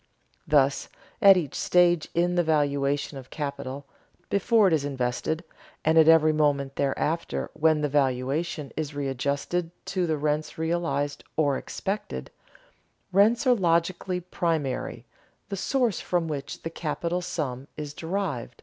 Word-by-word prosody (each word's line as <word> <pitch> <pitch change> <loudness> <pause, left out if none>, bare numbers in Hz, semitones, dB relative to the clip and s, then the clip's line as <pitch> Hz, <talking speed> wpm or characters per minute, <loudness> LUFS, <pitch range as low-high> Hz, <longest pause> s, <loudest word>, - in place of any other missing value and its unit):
Thus, 140 -2 +2 0.3
at 195 -3 +8
each 155 -7 -2
stage 175 -2 +3
in 175 +1 +2
the 175 - +3
valuation 145 -3 0
of 130 0 -13
capital, 140 -2 -5 0.5
before 210 +2 +4
it 175 - +2
is 155 -3 +2
invested 140 +4 -2 0.4
and 160 +1 +4
at 160 -1 +7
every 160 -1 +6
moment 140 -3 +1
thereafter 140 - -1
when 155 -1 +2
the 150 - +1
valuation 140 +2 0
is 150 -2 -4
readjusted 140 +5 -1 0.2
to 180 -2 -1
the 155 -1 0
rents 150 +1 -1
realized 160 -4 -1
or 145 -3 +3
expected, 200 +9 -4 0.8
rents 215 +7 +4
are 255 - +6
logically 180 -1 +1
primary, 165 -6 -2 0.4
the 195 - -2
source 240 +2 0
from 175 -2 0
which 145 -3 -5
the 165 - -4
capital 170 +2 -2
sum 145 -8 -4
is 150 -1 -5
derived. 160 - -3
155 Hz, 135 wpm, -26 LUFS, 140-175 Hz, 0.8 s, at